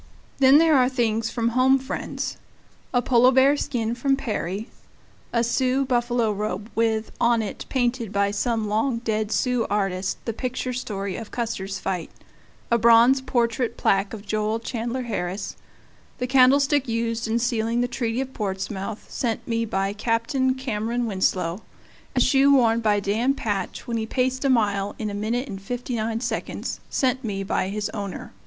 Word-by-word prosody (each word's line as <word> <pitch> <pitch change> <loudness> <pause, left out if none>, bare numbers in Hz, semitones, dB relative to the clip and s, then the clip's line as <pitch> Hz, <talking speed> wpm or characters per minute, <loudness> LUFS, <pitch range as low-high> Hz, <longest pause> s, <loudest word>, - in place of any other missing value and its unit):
Then 270 +1 +7
there 320 -1 +5
are 250 -1 +4
things 230 -3 0
from 230 -1 0
home 255 +3 +4
friends: 265 +1 -4 0.5
a 245 -1 +2
Polar 250 +1 +5
bear 265 +2 +5
skin 235 -5 -2
from 270 +3 +1
Peary; 215 -5 -3 0.6
a 235 -1 +2
Sioux 255 +3 +1
buffalo 240 -3 +1
robe 210 +1 -4
with, 220 -1 0
on 235 -1 +3
it, 205 - -6
painted 245 -4 0
by 200 0 +1
some 220 +1 -1
long 225 +4 +1
dead 220 -2 -2
Sioux 250 0 +1
artist, 195 -2 -1
the 230 - -2
picture 255 +1 -3
story 200 -6 -4
of 225 -2 -7
Custer's 200 -5 -3
fight; 180 -3 -3 0.6
a 235 - +4
bronze 235 +4 +6
portrait 235 -2 0
plaque 195 +1 +2
of 215 -2 -8
Joel 215 +1 0
Chandler 235 +2 -3
Harris; 195 -4 -3 0.6
the 250 - -2
candlestick 275 +2 +4
used 230 0 -1
in 225 +1 +1
sealing 235 0 0
the 245 - +1
Treaty 240 0 -2
of 265 0 -6
Portsmouth, 195 +1 -4
sent 230 -3 -3
me 230 -1 0
by 195 -2 -1
Captain 240 +4 0
Cameron 240 -2 -2
Winslow; 185 -3 0 0.5
a - - +3
shoe 270 +2 +5
worn 230 -4 +4
by 210 -2 +2
Dan 220 +7 +1
Patch 205 -7 -3
when 235 -1 -2
he 220 0 -2
paced 260 +2 0
a 275 - +2
mile 205 -5 +1
in 215 - -3
1:59, 230 +2 -3
sent 260 0 0
me 195 -3 -3
by 190 -1 -1
his 205 +1 -2
owner. 200 -3 -6
230 Hz, 155 wpm, -24 LUFS, 210-250 Hz, 0.6 s, Then